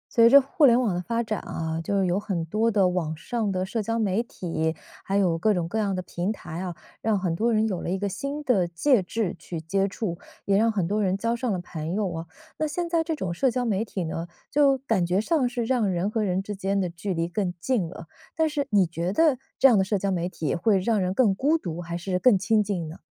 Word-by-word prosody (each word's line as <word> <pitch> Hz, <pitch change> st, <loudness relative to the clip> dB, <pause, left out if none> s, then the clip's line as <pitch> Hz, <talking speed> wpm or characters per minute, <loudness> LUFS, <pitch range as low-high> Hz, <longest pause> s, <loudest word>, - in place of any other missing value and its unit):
随 230 Hz, 0 st, +7 dB
着 280 Hz, +3 st, +9 dB
互 280 Hz, +3 st, +3 dB
联 240 Hz, 0 st, +5 dB
网 230 Hz, -7 st, +1 dB
的 175 Hz, -, -2 dB
发 230 Hz, +5 st, -1 dB
展 215 Hz, -2 st, -2 dB
啊， 160 Hz, 0 st, -4 dB
就 200 Hz, +3 st, 0 dB
是 190 Hz, -, +2 dB
有 180 Hz, +2 st, +1 dB
很 190 Hz, -6 st, -3 dB
多 215 Hz, +7 st, +1 dB
的 200 Hz, -4 st, +3 dB
网 165 Hz, -4 st, -2 dB
上 220 Hz, +4 st, -2 dB
的 185 Hz, 0 st, -1 dB
社 220 Hz, +3 st, -2 dB
交 225 Hz, +2 st, -2 dB
媒 210 Hz, -1 st, +1 dB
体， 165 Hz, -8 st, -3 dB, 0.3 s
还 195 Hz, -, 0 dB
有 175 Hz, -4 st, +2 dB
各 210 Hz, +4 st, +2 dB
种 170 Hz, -2 st, -1 dB
各 220 Hz, +6 st, -2 dB
样 200 Hz, -3 st, 0 dB
的 185 Hz, -, -3 dB
平 175 Hz, +3 st, -2 dB
台 170 Hz, -6 st, -7 dB
啊， 180 Hz, -2 st, -4 dB, 0.3 s
让 220 Hz, -2 st, +1 dB
很 180 Hz, -3 st, -1 dB
多 230 Hz, +6 st, +1 dB
人 220 Hz, 0 st, +2 dB
有 185 Hz, -4 st, -2 dB
了 -, -, -4 dB
一 190 Hz, -, 0 dB
个 200 Hz, +1 st, -2 dB
新 280 Hz, +10 st, -4 dB
的 200 Hz, -11 st, +2 dB
介 210 Hz, -, +2 dB
质 190 Hz, +1 st, -2 dB
去 170 Hz, -, -6 dB
接 195 Hz, +5 st, 0 dB
触， 190 Hz, -3 st, -4 dB, 0.3 s
也 200 Hz, -, +2 dB
让 225 Hz, +3 st, +3 dB
很 195 Hz, -6 st, -1 dB
多 210 Hz, +3 st, 0 dB
人 190 Hz, -1 st, +1 dB
交 230 Hz, +3 st, 0 dB
上 235 Hz, 0 st, -2 dB
了 190 Hz, -, 0 dB
朋 165 Hz, 0 st, -5 dB
友 200 Hz, -4 st, -1 dB
啊。 165 Hz, 0 st, -5 dB, 0.3 s
那 310 Hz, -, +1 dB
现 340 Hz, +3 st, -2 dB
在 335 Hz, -1 st, +1 dB
这 325 Hz, 0 st, -2 dB
种 185 Hz, -, -3 dB
社 260 Hz, +10 st, +2 dB
交 250 Hz, 0 st, -1 dB
媒 215 Hz, -2 st, +1 dB
体 200 Hz, -4 st, -4 dB
呢， 165 Hz, +1 st, -4 dB, 0.2 s
就 280 Hz, -1 st, +4 dB
感 225 Hz, -8 st, 0 dB
觉 175 Hz, +2 st, +1 dB
上 265 Hz, +2 st, +1 dB
是 240 Hz, -1 st, -2 dB
让 230 Hz, -4 st, +1 dB
人 185 Hz, +3 st, -1 dB
和 220 Hz, -1 st, 0 dB
人 190 Hz, -1 st, 0 dB
之 205 Hz, +1 st, -5 dB
间 195 Hz, +1 st, -1 dB
的 180 Hz, -3 st, -1 dB
距 175 Hz, +2 st, -4 dB
离 165 Hz, 0 st, 0 dB
更 180 Hz, +1 st, -1 dB
近 220 Hz, -3 st, 0 dB
了。 170 Hz, -, -10 dB, 0.3 s
但 320 Hz, -1 st, +2 dB
是 290 Hz, -2 st, -2 dB
你 200 Hz, -3 st, +4 dB
觉 170 Hz, +2 st, -3 dB
得 295 Hz, +2 st, +3 dB, 0.2 s
这 270 Hz, -, +7 dB
样 245 Hz, -, +5 dB
的 -, -, +4 dB
社 200 Hz, +1 st, 0 dB
交 195 Hz, +1 st, -1 dB
媒 175 Hz, -1 st, -1 dB
体 155 Hz, -5 st, -2 dB
会 200 Hz, +4 st, +2 dB
让 210 Hz, +2 st, +1 dB
人 185 Hz, 0 st, 0 dB
更 205 Hz, 0 st, +3 dB
孤 285 Hz, +11 st, +2 dB
独， 175 Hz, -, -5 dB
还 170 Hz, 0 st, -4 dB
是 180 Hz, +1 st, -2 dB
更 240 Hz, -1 st, +5 dB
亲 210 Hz, +3 st, +2 dB
近 185 Hz, -5 st, -3 dB
呢？ 155 Hz, -, -9 dB
200 Hz, 285 characters per minute, -25 LUFS, 175-230 Hz, 0.3 s, 着